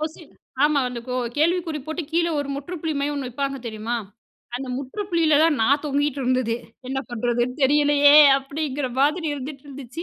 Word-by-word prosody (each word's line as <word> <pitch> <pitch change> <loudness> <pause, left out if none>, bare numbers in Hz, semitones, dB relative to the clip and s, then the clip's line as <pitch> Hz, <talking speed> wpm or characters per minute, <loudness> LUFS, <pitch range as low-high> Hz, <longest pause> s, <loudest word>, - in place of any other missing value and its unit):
Question 315 +1 -6 0.3
ஆமா, 300 -1 +3
அந்த 240 -1 -6 0.4
கேள்விக்குறி 330 -1 +1
போட்டு 315 +2 -3
கீழ 335 +1 +2
ஒரு 285 - -5
முற்றுப்புள்ளி 320 +1 -4
மாரி 285 +1 -1
ஒண்ணு 270 -3 -4
வைப்பாங்க, 275 +2 -3
தெரியுமா? 225 +1 -3 0.6
அந்த 265 +1 -6
முற்றுப்புள்ளியிலதான் 320 -1 +1
நான் 280 +5 +3
தொங்கிகிட்டு 285 -1 -1
இருந்ததே, 250 -2 0 0.3
"என்ன 265 - -2
பண்றதுன்னு 240 +3 -1
தெரியலையே"அப்படிங்கிற 285 0 +4
மாதிரி 305 +4 +2
இருந்துட்டு 275 0 -8
இருந்துச்சு. 275 +3 -8
285 Hz, 140 wpm, -23 LUFS, 260-310 Hz, 0.6 s, தெரியலையே"அப்படிங்கிற